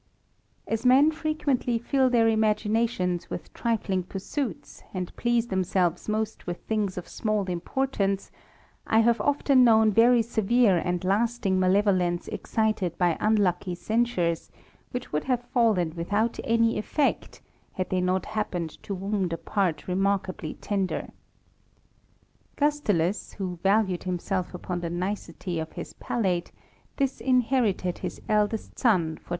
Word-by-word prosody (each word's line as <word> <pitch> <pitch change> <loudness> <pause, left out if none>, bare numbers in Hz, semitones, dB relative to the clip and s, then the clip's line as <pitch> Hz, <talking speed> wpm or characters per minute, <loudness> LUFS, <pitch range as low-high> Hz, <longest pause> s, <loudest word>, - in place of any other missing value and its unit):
As 225 +1 -2
men 265 +5 +6
frequently 305 -6 0
fill 260 +3 +2
their 235 -2 +4
imaginations 215 -4 +1
with - - -7
trifling 210 -5 -1
pursuits, 195 - -5
and 180 -1 -4
please 240 0 +1
themselves 185 -1 0
most 215 -1 -2
with 175 0 -3
things 210 -4 -2
of 180 - -5
small 215 -2 -1
importance, 195 +2 -1 0.6
I 220 - +4
have 230 -1 +3
often 280 0 +3
known 220 -2 +5
very 230 +2 +5
severe 225 -2 +3
and 180 +1 -2
lasting 200 0 +1
malevolence 185 -2 +2
excited 215 -6 -1
by 175 -3 +2
unlucky 195 -4 +1
censures, 185 -6 0 0.4
which 250 - -6
would 150 - -1
have 250 -2 0
fallen 210 -10 +2
without 205 +7 -1
any 230 -1 +2
effect, 280 +6 -1 0.3
had 185 - -3
they 185 -1 +1
not 185 0 0
happened 180 -7 -3
to 200 - -4
wound 195 -1 -1
a - - -2
part 180 -1 -1
remarkably 190 -3 -1
tender. 195 -3 -2 1.5
Gustulus, 210 - 0
who 180 -3 -5
valued 195 -3 +2
himself 185 0 -2
upon 180 0 -4
the 170 -1 -3
nicety 175 -1 -3
of 160 0 -5
his - - -7
palate, 185 -7 -1 0.5
disinherited 250 - +1
his - - -5
eldest 210 0 0
son 225 -7 +4
for 160 -1 -3
6o - - -6
THE - - -12
RAMBLER. - - -22
205 Hz, 135 wpm, -26 LUFS, 180-230 Hz, 1.5 s, men